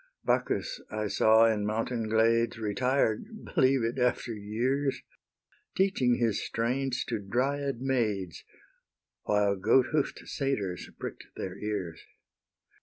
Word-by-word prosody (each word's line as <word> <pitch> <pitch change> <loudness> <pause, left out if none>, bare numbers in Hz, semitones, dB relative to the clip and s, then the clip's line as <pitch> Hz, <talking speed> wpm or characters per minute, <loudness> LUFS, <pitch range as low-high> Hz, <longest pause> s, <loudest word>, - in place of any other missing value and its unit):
Bacchus - - 0
I 110 0 -3
saw 110 +2 +5
in 110 -2 +2
mountain 110 +2 -2
glades 115 +1 +3
Retired 125 - -1
(believe 130 -1 +3
it, 115 +3 -1
after 125 -1 0
years!) 120 +7 -1 0.8
Teaching 185 -11 +3
his 115 -4 0
strains 125 +2 -1
to - - -2
Dryad 130 +5 -1
maids, 110 -10 -1 0.8
While 105 -1 +2
goat 125 +6 +3
hoof'd 150 -2 -1
satyrs 105 - -2
prick'd - - -7
their - - -5
ears. 95 -6 -4
115 Hz, 110 wpm, -29 LUFS, 105-135 Hz, 0.8 s, saw